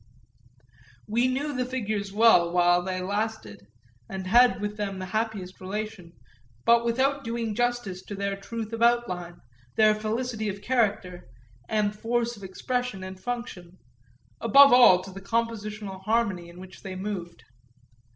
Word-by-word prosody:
We 235 +4 +2
knew 280 +3 -2
the 250 -1 -1
figures 215 -6 -3
well 205 -5 +5
while 175 0 +4
they 185 0 -3
lasted 200 - -4 0.4
and 190 -1 -5
had 240 +6 +5
with 210 0 -3
them 200 -2 -4
the 185 - -5
happiest 205 -2 -3
relation, 200 -2 -6 0.5
but 235 0 +5
without 265 +4 +1
doing 230 -1 -3
justice 240 -5 -1
to 205 - -6
their 200 0 -2
truth 220 +2 -6
of 230 - -4
outline, 185 -8 +1 0.4
their 215 -1 +5
felicity 220 +1 -3
of 200 0 -5
character 205 - -1 0.4
and 210 -1 0
force 235 +2 -1
of 200 - -14
expression 245 +2 -3
and 185 0 -8
function, 190 -6 -6 0.6
above 275 +4 +7
all 185 -8 +7
to 190 - -9
the 195 +1 -9
compositional 210 -2 -3
harmony 200 -5 0
in 170 +1 -13
which 185 0 -12
they 190 -1 -7
moved. 185 -3 -6
210 Hz, 145 wpm, -26 LUFS, 185-235 Hz, 0.6 s, above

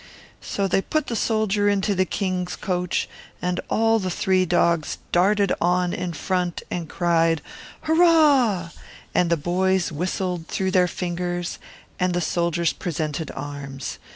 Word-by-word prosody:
So 200 -1 -1
they 195 +1 +2
placed 310 +7 -1
the 235 - -2
soldier 215 -2 +1
in 200 -1 +2
the 190 -2 +1
king's 185 -2 -2
carriage, 180 -2 -1 0.3
and 180 0 -1
the 225 -3 +2
three 185 +1 +1
dogs 170 -2 +2 0.2
ran 190 +4 +4 0.2
on 180 0 +2
in 180 -2 -3
front 180 +2 -2
and 170 -3 -3
cried 165 -3 +2 0.4
"Hurrah!" 295 - +4 0.4
and 175 - +2
the 170 - +4
little 165 +2 -4
boys 190 -1 +2
whistled 180 +1 -2
through 190 -1 -1
their 180 -1 +4
fingers, 175 0 -3 0.4
and 180 -1 +1
the - - +2
soldiers 170 -1 0
presented 155 -2 -3
arms. 140 -2 -6
180 Hz, 140 wpm, -23 LUFS, 170-195 Hz, 0.4 s, ran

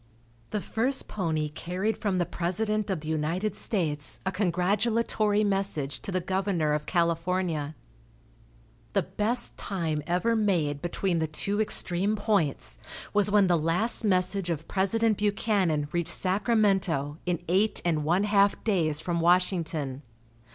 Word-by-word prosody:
The 210 - -2
first 255 +7 0
pony 160 -6 -1
carried 180 +8 -3
from 200 -3 -1
the 175 - +1
president 210 +6 -1
of 185 -5 -2
the 155 - -8
United 160 +7 -1
States 155 -8 0
a 190 - 0
congratulatory 210 +3 +1
message 195 -8 0
to - - -6
the 185 - 0
governor 185 -4 0
of 150 0 -2
California. 170 -3 0 1.2
The - - +2
best 210 +6 -1
time 165 -6 -2
ever 180 +7 +1
made 170 -10 0
between 175 0 -1
the 160 - 0
two 200 +7 +1
extreme 200 -1 0
points 165 - -1 0.3
was 205 0 +3
when 205 -1 +4
the 175 -3 +2
last 175 +11 +1
message 185 -2 +1
of 160 -1 -3
President 215 +3 +2
Buchanan 200 -7 +1
reached 170 -1 0
Sacramento 190 - +1
in 175 -1 +1
eight 195 +6 +1
and 160 -3 +1
one 175 +6 +2
half 200 -1 +2
days 160 -8 +1
from 170 0 -1
Washington. 165 -6 +1
185 Hz, 135 wpm, -27 LUFS, 165-205 Hz, 1.2 s, when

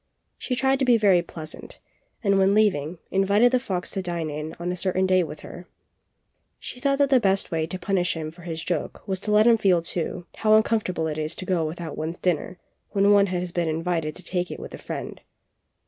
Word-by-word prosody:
She 250 - -2
tried 265 +2 +2
to - - +1
be 245 -2 +5
very 195 -5 +4
pleasant, 160 -2 -9 0.5
and 200 -2 +3
when 195 +1 +4
leaving, 180 -6 +2
invited 200 +5 +4
the 255 - +3
fox 185 -8 -3
to 195 - -2
dine 160 -3 -4
on 175 +1 -2
a - - -2
certain 185 +1 0
day 185 0 +4
with 155 -3 -6
her. 175 0 -10 0.9
She 250 - -9
thought 275 +1 +1
that 280 -1 +2
the 260 - +6
best 195 -3 +1
way 160 -1 -1
to 185 - -5
punish 180 -1 0
him 155 -1 -4
for 175 +2 -16
his 165 -2 -5
joke 175 - -4
was 190 -1 -1
to 210 - -3
let 210 +1 +5
him 230 -1 +5
feel, 180 -5 +3
too, 170 +1 -2
how - - 0
THE - - -6
FOX - - -5
AND 175 - -14
THE - - -17
STORK. - - -10
43 215 0 +7
uncomfortable 210 -7 0
it 155 -1 -3
is 155 +2 -2
to 185 - -6
go 175 -3 +1
without 160 -1 -6
one's 160 +3 -3
dinner 180 0 -1 0.3
when 200 0 +3
one 200 -1 +5
has 180 -1 -2
been 170 -1 -1
invited 165 -1 -1
to 185 - -11
take 180 +1 -2
it - - -7
with - - -9
a - - -8
friend. - - -6
180 Hz, 240 wpm, -25 LUFS, 165-205 Hz, 0.9 s, 43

